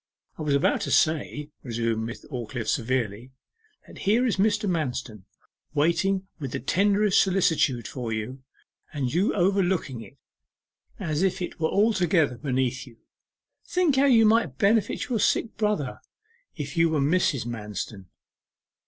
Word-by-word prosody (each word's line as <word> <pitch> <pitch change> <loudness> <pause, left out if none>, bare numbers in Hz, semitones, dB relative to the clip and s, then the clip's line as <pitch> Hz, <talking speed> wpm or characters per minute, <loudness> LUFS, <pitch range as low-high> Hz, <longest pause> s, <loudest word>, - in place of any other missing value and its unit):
'I - - -4
was 150 -2 +1
about 140 - +2
to - - -3
say,' 150 -1 +1
resumed 115 -2 -2
Miss 115 - -8
Aldclyffe 120 -3 -5
severely, 120 -1 -1 0.5
'that - - -13
here 225 +6 +2
is 230 - 0
Mr. 210 +1 +2
Manston 130 - -3 0.5
waiting 185 +6 +1
with 135 -5 -5
the - - -2
tenderest 200 - +3
solicitude 160 - +1
for 120 -3 -5
you, 110 +5 -4 0.5
and 135 -4 -2
you 185 +6 +2
overlooking 180 - +1
it, 105 - -14 0.8
as 155 -1 -2
if 190 -1 +1
it 180 - -5
were 160 0 +1
altogether 180 - +2
beneath 130 -2 -1
you. 115 - -15 0.7
Think 360 -6 +2
how 275 - +5
you 235 -5 +6
might 215 - +2
benefit 220 - +1
your 240 -5 -1
sick 225 - +1
brother 210 - -1 0.6
if 145 -2 -6
you 165 0 +4
were 155 -2 0
Mrs. 140 -4 +1
Manston. 105 -4 -6
155 Hz, 145 wpm, -26 LUFS, 125-195 Hz, 0.8 s, you